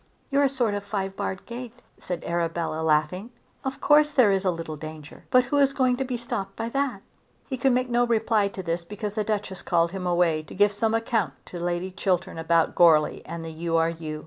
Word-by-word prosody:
"You're 280 +1 +3
a 280 - +4
sort 245 -6 0
of 205 - -2
a - - -20
five 195 -2 -3
barred 190 -1 -4
gate," 245 0 -8 0.2
said 180 -2 -5
Arabella 170 -1 -1
laughing. 160 +7 +1 0.3
"Of 265 0 -4
course 300 0 +5
there 255 -8 +4
is 195 0 +1
a 190 - +2
little 165 -3 -4
danger, 155 0 -10
but 255 0 +5
who 265 +4 -1
is 275 -1 +4
going 255 -2 +2
to 270 - 0
be 250 -2 -3
stopped 200 -5 -4
by 225 +1 -3
that?" 265 -6 -2 0.4
He 265 - -3
could 260 +1 +2
make 250 +1 +1
no 240 0 +2
reply 220 -2 +2
to 195 -1 -7
this 170 0 -2
because 205 +3 -5
the 215 0 -1
Duchess 205 -3 -3
called 170 -1 +1
him 185 -1 -4
away 175 -3 +2
to 155 - -12
give 205 +1 +4
some 220 +2 +1
account 225 - 0
to 175 - -8
Lady 175 +2 -2
Chiltern 185 -3 -1
about 165 0 +2
Goarly 160 -3 +4
and 165 -1 -6
the 165 - -6
U. 165 +1 -1
R. 165 0 +2
U. 155 -2 -6
195 Hz, 225 wpm, -25 LUFS, 170-235 Hz, 0.4 s, course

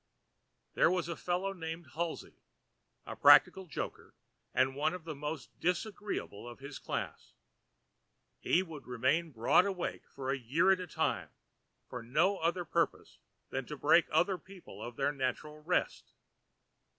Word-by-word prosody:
There - - +4
was 180 -2 0
a 170 - -3
fellow 180 +4 -1
named 165 -3 -6
Halsey, 170 +1 -3 0.7
a - - -6
practical 190 -1 +6
joker, - - -6 0.4
and 130 +1 +2
one 155 +5 +1
of 180 - -9
the 160 -1 -5
most 145 -4 -5
disagreeable 180 - -2
of 120 - -9
his 140 +1 -8
class. - - -5 1.1
He 180 - +2
would 160 -5 -10
remain 130 +7 +1
broad 125 - +4
awake 185 -3 -4
for 135 -1 -4
a 135 - -1
year 155 +11 +3
at 190 - +3
a 180 - -5
time, - - -1 0.6
for 125 - -6
no 175 +12 +2
other 170 +2 0
purpose 170 +1 -1 0.3
than 135 -1 -3
to 150 - -6
break 155 +4 +5
other 180 +4 +2
people 190 -2 -13
of 120 0 -6
their 140 +2 +1
natural 145 +2 -3
rest. - - -1
160 Hz, 150 wpm, -33 LUFS, 135-180 Hz, 1.1 s, practical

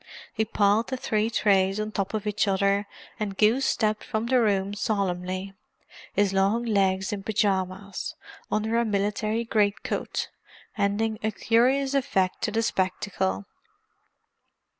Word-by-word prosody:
He 220 -1 0
piled 210 +2 +2
the 260 - -3
three 215 -3 0
trays 195 -3 +2
on 215 0 -2
top 200 0 -2
of 215 -1 -3
each 210 0 0
other 200 +1 +2 0.3
and 200 -3 -3
goose 230 +6 +3
stepped 215 -2 0
from 220 +1 -2
the 250 +1 +3
room 200 -2 +1
solemnly—his 195 0 -3
long 200 +5 +2
legs 195 -3 +1
in 200 - -4
pyjamas, 195 -2 -1 0.4
under 220 +2 +1
a - - +2
military 215 +2 0
great 205 -3 +1
coat, - - -3 0.5
ending 210 +1 0
a 220 - 0
curious 260 +5 +2
effect 195 -9 0
to - - 0
the 225 +2 0
spectacle. 185 - -1
205 Hz, 135 wpm, -26 LUFS, 195-220 Hz, 0.5 s, goose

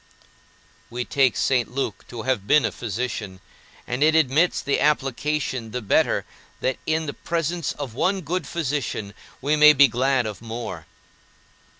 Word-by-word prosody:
We 120 +1 -4
take 135 -4 +2
St. 125 -3 +1
Luke 135 +2 -4
to 115 -2 -7
have 125 -7 -1
been 150 -4 +5
a - - 0
physician, 110 -4 -4 0.5
and 125 +3 -3
it 155 +1 +4
admits 160 +3 +3
the 140 - 0
application 135 -3 0
the 125 +3 -4
better 100 - +2 0.3
that 130 - -1
in 160 0 +1
the 140 - -4
presence 170 -1 -2
of 140 -6 -6
one 190 - 0
good 170 0 -3
physician 140 -10 -3 0.3
we 145 +3 +2
may 150 0 +8
be 140 0 +7
glad 130 +1 +1
of 105 -1 -6
more. 115 +1 -6
135 Hz, 155 wpm, -23 LUFS, 120-150 Hz, 0.5 s, may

